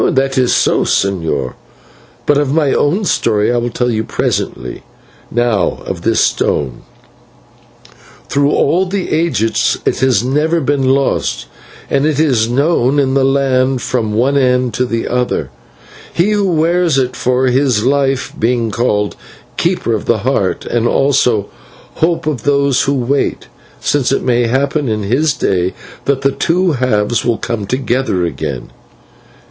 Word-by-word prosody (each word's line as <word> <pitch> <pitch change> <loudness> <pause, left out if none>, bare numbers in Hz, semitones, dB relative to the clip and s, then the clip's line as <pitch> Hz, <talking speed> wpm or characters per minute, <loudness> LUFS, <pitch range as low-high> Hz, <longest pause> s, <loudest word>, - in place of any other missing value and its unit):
"That 135 0 0
is 125 -2 +2
so, - - +2
señor, 80 -9 -1 0.7
but 145 -1 +3
of 145 -2 0
my 150 -2 +2
own 185 +9 +1
story 110 - +1
I - - +1
will 120 0 -1
tell 125 +1 -1
you 110 -1 -1
presently. 65 - -3 0.5
Now 120 -6 0
of - - -5
this - - +1
stone. 65 -4 0 1.5
Through 140 0 +1
all 175 +6 +2
the 190 0 -3
ages 155 -9 +1
it - - 0
has 125 -5 +2
never 150 +6 +1
been 135 -2 0
lost, 135 +1 0 0.4
and 140 +2 +1
it 150 -2 0
is 125 -8 +2
known 140 0 +1
in 135 -2 +2
the 135 -1 +2
land 135 -1 +1
from 125 -3 -1 0.3
end 125 -3 +2
to 125 +3 -1
end; 115 - -1 0.6
he 180 +5 +1
who 205 -3 +1
wears 165 -1 +2
it 130 -1 0
for 125 +2 +1
his 125 -4 +1
life 135 -1 0
being 115 -1 0
called 105 -2 0 0.4
'Keeper - - 0
of - - -2
the - - +2
Heart,' - - 0
and 120 0 0
also 120 -7 +2 0.5
'Hope 165 0 0
of 150 -7 -2
those 140 0 +2
who 140 - +1
wait,' 135 +2 -1 0.3
since 140 -4 0
it 135 - 0
may 120 -1 +2
happen 140 +2 0
in 105 -1 -1
his 140 +9 +1
day 90 -1 0 0.3
that 140 -1 0
the 135 0 +2
two 175 +5 +1
halves 120 -5 0
will 120 -2 0
come 105 -4 -4
together 125 -6 -1
again." 75 -5 -5
130 Hz, 150 wpm, -15 LUFS, 115-140 Hz, 1.5 s, but